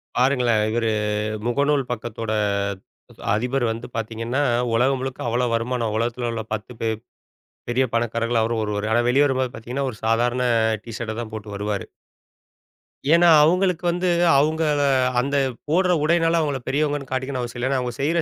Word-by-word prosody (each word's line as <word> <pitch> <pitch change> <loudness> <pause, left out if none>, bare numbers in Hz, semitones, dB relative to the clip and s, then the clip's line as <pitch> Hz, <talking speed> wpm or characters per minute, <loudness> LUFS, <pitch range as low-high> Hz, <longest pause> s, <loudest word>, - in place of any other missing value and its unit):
பாருங்களேன், 125 -4 +2
இவரு 115 -1 0 0.6
முகநூல் 140 +2 +1
பக்கத்தோட, 115 -1 -4 1.0
அதிபர் 125 +4 0
வந்து 115 +2 -5
பார்த்தீங்கன்னா, 115 +4 -2 0.3
உலகம் 130 +3 +2
முழுக்க 130 -2 -4
அவ்ளோ 120 +2 +1
வருமானம். 115 -1 -1
உலகத்துல 120 +1 -1
உள்ள 115 -1 -4
10 110 +3 -6
பெர் 110 -1 -1 0.7
பெரிய 130 +2 +2
பணக்காரர்கள்ல 115 0 0
அவரும் 115 0 -1
ஒருவரு. 105 0 -2
ஆனா 120 +2 +4
வெளிய 140 +4 +4
வரும்போது, 130 -2 0
பார்த்தீங்கன்னா. 125 +5 -3
ஒரு 110 - -12
சாதாரண 120 +2 +1 0.4
டீஷர்ட்ட 115 -1 -5
தான் 110 -2 -7
போட்டு 110 -1 -7
வருவாரு. 105 0 -3 1.3
ஏன்னா, 175 +1 +5 0.2
அவங்களுக்கு 180 +2 +2
வந்து, 180 +1 0 0.3
அவங்க 155 +3 +2 0.6
அந்த 140 +3 -2 0.3
போடுற 180 +3 +3
உடையினால 165 +1 +3
அவங்கள 140 -4 -2
பெரியவங்கன்னு 145 -1 -1
காட்டிக்கணும் 130 0 -2
அவசியம் 120 0 -6
இல்ல. 130 - 0
ஏன்னா 135 - +1
அவங்க 125 -1 -4
செய்யற 165 +4 +1
125 Hz, 145 wpm, -22 LUFS, 115-140 Hz, 1.3 s, ஏன்னா